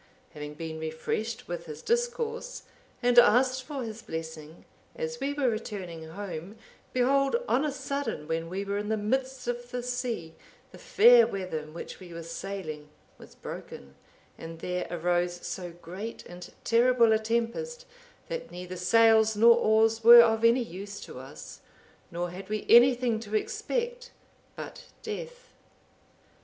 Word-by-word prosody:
Having 150 0 -8
been 160 0 -6
refreshed 215 +9 -4
with 170 -1 -5
his 150 -1 -8
discourse, 475 +1 -2 0.4
and 245 0 +7
asked 255 +3 +4
for 275 -1 -5
his 225 -1 -7
blessing, 160 -2 -8 0.3
as 480 0 -4
we 280 - -1
were 285 -2 0
returning 190 -8 -4
home, 185 +1 -7 0.4
behold 275 - +2
on 275 - +2
a 300 - 0
sudden, 270 - -4
when 165 +1 -2
we 195 +3 -3
were 200 +1 -2
in 210 0 -4
the 220 - +1
midst 260 +4 -2
of 245 0 -3
the 245 -1 -4
sea, 245 -9 -3 0.4
the - - -13
fair 475 +2 +6
weather 185 -5 -4
in 155 0 -11
which 170 - -8
we 175 -3 -11
were 170 - -6
sailing, 165 -3 -6 0.3
was - - -15
broken, 70 0 -9 0.5
and 165 0 -8
there 180 +2 -3
arose 175 +1 -1
so 180 -2 -5
great 180 +6 -8
and 175 0 -10
terrible 235 -1 +4
a 220 - +3
tempest, 235 - -2 0.4
that - - -5
neither 180 +1 -7
sails 220 +3 +4
nor 230 +2 +7
oars 225 0 +3
were 235 +1 +11
of 225 -1 +1
any 235 +2 +5
use 200 0 -8
to - - -9
us, 130 +1 -11 0.5
nor 175 +1 -3
had 190 +2 -9
we 215 0 -3
anything 240 -1 +5
to 215 -1 -5
expect 485 - -2 0.5
but - - -9 0.2
death. 485 +3 -7
220 Hz, 150 wpm, -28 LUFS, 175-255 Hz, 0.5 s, were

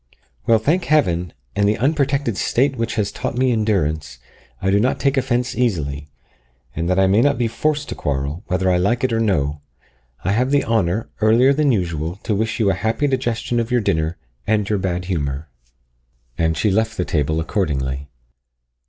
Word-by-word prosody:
Well, 115 - +6
thank 155 +11 +1
Heaven, 90 - +2 0.2
and 100 0 +3
the 105 - +1
unprotected 140 -2 +1
state 135 +7 +1
which 115 -1 -2
has 105 -3 0
taught 120 - -4
me 130 0 +3
endurance, 90 - 0 0.4
I 95 - 0
do 100 - +4
not 125 +5 +1
take 140 0 +1
offence 125 -2 0
easily; 75 - -1 0.7
and 85 +1 -2
that 90 - +2
I 95 - +5
may 100 +4 +4
not 140 +1 +3
be 120 -1 +1
forced 145 +6 -1
to - - -2
quarrel, 70 +5 -3
whether 95 0 0
I 90 - +3
like 110 +8 +1
it 130 -2 +1
or 115 - +1
no, 75 -10 0 0.6
I 95 - 0
have 125 +5 +1
the 145 0 +2
honour, 110 -2 0
earlier 120 +5 +5
than 145 -1 +2
usual, 85 -5 -1
to 110 - -1
wish 110 +3 -1
you 100 -3 +3
a - - +1
happy 110 - -1
digestion 120 -3 -1
of 115 0 -1
your 125 -1 +2
dinner 80 -3 0 0.3
and 105 -1 +1
your 105 -2 0
bad 90 -1 -2
humour." 75 -4 -3 0.9
And 80 -1 0
she 105 - +2
left 110 +2 0
the 90 - 0
table 80 0 0
accordingly. 70 - -2
105 Hz, 190 wpm, -20 LUFS, 85-120 Hz, 0.9 s, Well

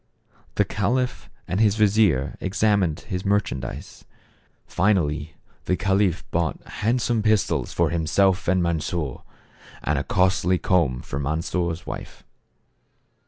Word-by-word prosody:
The - - +3
caliph 125 +4 -1 0.2
and 90 - -1
his 105 -2 +4
vizier 100 - +3
examined 100 -4 +1
his 90 -3 -4
merchan 100 -8 0
dise. 60 - -8 0.6
Finally 80 -5 0 0.3
the 90 - +1
caliph 95 -2 +1
bought 85 -2 -1
handsome 115 +1 0
pistols 110 -1 +1
for 85 -2 +1
himself 90 +3 +2
and 90 0 +3
Mansof, 80 -4 -2 0.6
and 75 -2 +1
a - - -2
costly 95 +2 +2
comb 80 -10 +1
for 70 - -5
Mans 80 +4 -2
or' 85 -2 +1
s 80 +1 -7
wife. - - -8
90 Hz, 125 wpm, -24 LUFS, 80-105 Hz, 0.6 s, his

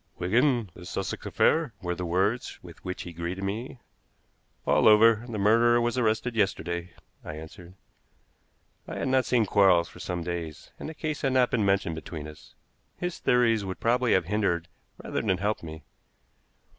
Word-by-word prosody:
"Wigan, 120 +2 +1
this 90 -1 -10
Sussex - - -4
affair?" 155 -7 +2
were 90 -2 -3
the 90 0 -4
words 100 +8 0
with 85 -3 -13
which 90 -1 -5
he 85 - -9
greeted 85 +3 -4
me. 110 +7 -4 0.9
"All - - +4
over. 110 +1 +6
The 110 - -4
murderer 115 +4 +4
was 120 0 0
arrested 115 0 0
yesterday," 90 -4 -1 0.3
I - - -7
answered. 85 +3 -11 1.1
I - - -6
had - - -2
not 130 -1 +3
seen 120 -3 +2
Quarles 95 -4 +4
for - - -14
some 85 -1 -4
days, 85 -3 -6
and - - -6
the 160 - -9
case 155 -1 -3
had 135 -2 +1
not 125 -1 +3
been 115 -5 +1
mentioned 100 -4 +1
between 80 -1 -7
us. 75 0 -14 0.4
His 180 -1 -4
theories 115 -3 +3
would 95 -1 -5
probably 120 +1 +2
have 95 -2 +2
hindered 90 -4 0 0.3
rather - - -2
than 95 -4 +1
helped 105 +3 -1
me. 80 -2 -9
100 Hz, 170 wpm, -27 LUFS, 85-120 Hz, 1.1 s, over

